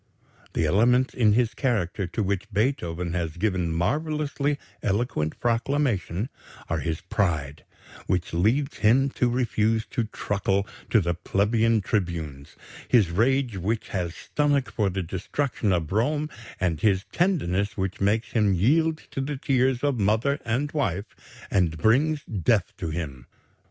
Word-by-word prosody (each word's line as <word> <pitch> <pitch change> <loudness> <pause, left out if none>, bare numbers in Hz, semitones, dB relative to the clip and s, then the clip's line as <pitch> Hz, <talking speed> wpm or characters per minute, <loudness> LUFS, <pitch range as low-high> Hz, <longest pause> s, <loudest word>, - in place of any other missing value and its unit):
The 80 - +1
elements 120 +10 +3
in 110 -4 +4
his 120 0 +2
character 105 - -1
to 110 +5 -2
which 100 +3 -2
Beethoven 90 -7 -1
has 85 -2 -2
given 90 -3 0
marvellously 145 - 0 0.2
eloquent 100 - -1
proclamation 120 - 0 0.4
are 80 - 0
his 80 0 -3
pride, 80 -8 -1 0.4
which 90 -2 -1
leads 120 - +1
him 130 +5 +3
to 125 - +1
refuse 115 -2 +1
to 120 -4 0
truckle 100 -2 -1 0.2
to 110 - +4
the 85 -1 0
plebeian 110 +5 +1
tribunes; 85 -9 -3 0.3
his 105 -9 +4
rage 120 +3 +1
which 105 +5 -2
had 90 -3 -2
stomach 145 +1 0
for 105 -4 +1
the 95 0 -2
destruction 100 - -2
of 85 -4 0
Rome, 145 +9 0 0.3
and 85 -5 0
his 95 -3 +2
tenderness 100 - 0
which 95 0 -3
makes 105 +3 +1
him 105 -4 +3
yield 155 - +2
to 135 - -2
the 140 +1 -3
tears 130 -1 +1
of 140 -5 +1
mother 110 +8 +2
and 130 +6 -1
wife 105 - -2 0.4
and 85 -4 +2
brings 140 - +2
death 100 -1 +1
to 85 - -3
him. 70 -7 -5
105 Hz, 140 wpm, -25 LUFS, 90-130 Hz, 0.4 s, in